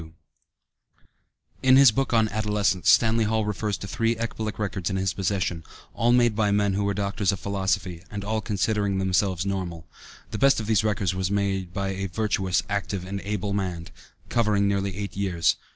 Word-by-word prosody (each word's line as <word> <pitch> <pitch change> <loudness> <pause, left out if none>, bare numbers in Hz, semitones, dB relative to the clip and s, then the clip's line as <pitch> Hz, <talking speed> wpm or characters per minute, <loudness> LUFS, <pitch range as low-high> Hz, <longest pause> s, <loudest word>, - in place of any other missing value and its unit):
52 80 0 -13 1.5
In 130 0 +6
his 135 -3 +8
book 135 +4 -1
on 110 -2 +3
Adolescence, 105 -3 0
Stanley 115 -1 +4
Hall 110 0 0
refers 105 -1 -2
to 100 - -7
three 115 +3 0
ecbolic 110 -1 -4
records 100 -4 -2
in 95 - -2
his 95 -1 0
possession, 95 -4 -2 0.3
all 120 +1 +2
made 120 -2 +4
by 105 -1 +2
men 100 -1 +2
who 100 +1 0
were 100 0 0
doctors 100 0 0
of 100 - -4
philosophy, 95 -3 -2
and 100 -1 -6
all 110 +1 -1
considering 100 -1 0
themselves 95 -1 +1
normal. 90 -4 -4 0.5
The - - -4
best 135 -2 +4
of 110 - -4
these 110 0 +2
records 105 -4 0 0.2
made 100 -3 -1
by 100 +2 -2
"a 95 0 -3
virtuous, 95 -2 0
active 100 -2 -3
and 100 +1 -5
able 100 -1 -3
man," 90 -4 -3 0.4
covered 105 -3 +1
nearly 100 -1 0
eight 100 -3 -5
years. 85 -5 +1
100 Hz, 180 wpm, -25 LUFS, 95-110 Hz, 1.5 s, his